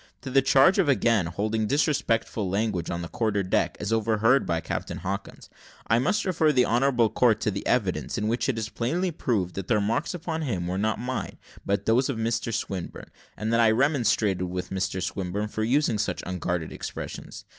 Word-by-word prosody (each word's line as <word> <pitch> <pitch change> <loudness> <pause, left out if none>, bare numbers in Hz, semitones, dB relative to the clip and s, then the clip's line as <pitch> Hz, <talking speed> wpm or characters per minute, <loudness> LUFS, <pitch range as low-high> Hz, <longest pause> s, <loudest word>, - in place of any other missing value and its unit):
To 135 - -6
the 135 +1 +5
charge 135 +8 +5
of 180 - +3
again 115 -8 +3
holding 110 +5 -1
disrespectful 115 - 0
language 100 -3 -1
on 85 0 -3
the - - -5
quarter 105 0 -1
deck, 90 - 0
as 105 +2 -2
overheard 115 +3 +2
by 85 -1 0
Captain - - -4
Hawkins, 100 +3 -5 0.4
I 115 - +3
must 205 - +1
refer 160 -5 +2
the 125 -3 +3
honourable 120 0 +3
court 110 -1 +3
to 105 - +1
the 100 - -4
evidence, 90 - 0
in 105 - -1
which 120 +4 0
it 125 - 0
is 110 -1 -2
plainly 170 +12 -1
proved 105 - -1
that 95 -1 -5
the 115 - +3
remarks 115 - 0
upon 165 -1 -4
him 100 - -2
were 90 +2 -2
not 110 +2 0
mine, 125 +1 -4 0.3
but 100 0 0
those 125 +5 +3
of 135 - -2
Mr 115 +1 -1
Swinburne, 95 -4 -5 0.3
and 110 +1 -2
that 115 - +3
I 115 -1 +6
remonstrated 110 - +2
with 90 0 -5
Mr 95 -1 -2
Swinburne 95 +3 -3
for 110 - -3
using 120 -2 +2
such - - -2
unguarded 90 -2 -3
expressions. - - -7
110 Hz, 195 wpm, -26 LUFS, 95-130 Hz, 0.4 s, I